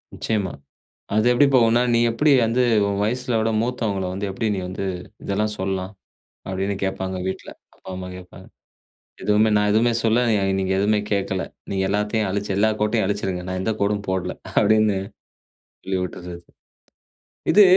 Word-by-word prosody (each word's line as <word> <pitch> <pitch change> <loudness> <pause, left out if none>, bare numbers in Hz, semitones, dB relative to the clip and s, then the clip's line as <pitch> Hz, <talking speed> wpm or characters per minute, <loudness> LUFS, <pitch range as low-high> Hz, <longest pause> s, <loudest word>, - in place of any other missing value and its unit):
நிச்சயமா. 105 -5 -1 0.6
அது 110 +1 +3
எப்படி 125 +4 +5
போகுன்னா, 120 -1 +5
"நீ 115 - +4
எப்டி 145 +6 +2
வந்து 120 +3 +2 0.2
உன் 100 0 -1
வயசுல 125 +2 0
விட 110 +1 +1
மூத்தவங்கள 110 -5 -1
வந்து 100 +2 -3
எப்படி 110 +4 -2
நீ - - -2
வந்து 95 +2 -4 0.4
இதெல்லாம் 105 +2 -1
சொல்லலாம்", 95 0 -2 0.6
அப்டின்னு 95 +1 -1
கேட்பாங்க, 95 -1 -2
வீட்ல. 95 - -5 0.3
அப்பா, - - -13
அம்மா 90 0 -6
கேட்பாங்க. 90 -1 -13 0.8
எதுவுமே 105 +2 +3
நான் 105 0 +2
எதுவுமே 115 +3 +3
சொல்லலா, 115 +2 +3 0.4
நீங்க 95 0 -1
எதுவுமே 105 +1 +2
கேட்கல. 95 -2 0 0.3
நீங்க 95 -1 0
எல்லாத்தையும் 105 +1 0
அழிச்சு, 100 +1 -2
எல்லா 110 +2 +4
கோட்டையும் 105 0 +2
அழிச்சிடுங்க. 95 -3 -2
நான் 95 0 -2
எந்த 110 - 0
கோடும் 100 0 0
போடல 95 -1 -1 0.3
அப்டின்னு 110 -1 +3 0.9
சொல்லி 95 0 -1
விட்டுறது. 90 -1 -6 1.2
இது 210 - +8
105 Hz, 150 wpm, -22 LUFS, 95-110 Hz, 1.2 s, இது